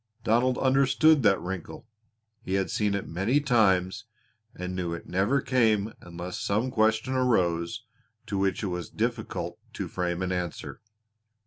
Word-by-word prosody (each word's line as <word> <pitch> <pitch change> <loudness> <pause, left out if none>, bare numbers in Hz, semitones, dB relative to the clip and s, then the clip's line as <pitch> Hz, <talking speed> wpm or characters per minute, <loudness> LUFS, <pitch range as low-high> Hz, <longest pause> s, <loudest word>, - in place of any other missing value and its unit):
Donald 120 +3 +2
understood 140 +3 +4
that 100 -4 +4
wrinkle; 90 -1 -6 0.5
he 95 -3 -2
had 95 -1 0
seen 105 -2 +1
it 100 - -4
many 95 - +1
times 110 -6 +2 0.5
and 90 0 -5
knew 90 -2 -2
it - - -10
never 100 +10 +1
came 110 -5 +2
unless 85 +1 -7
some 110 +6 0
question 110 +1 +2
arose 110 -4 +1 0.4
to 110 -2 -4
which 95 +2 0
it 100 - -1
was 90 -2 -4
difficult - - -3
to - - -4
frame 90 0 -2
an 95 - -2
answer. 90 -2 -4
100 Hz, 145 wpm, -27 LUFS, 90-120 Hz, 0.5 s, understood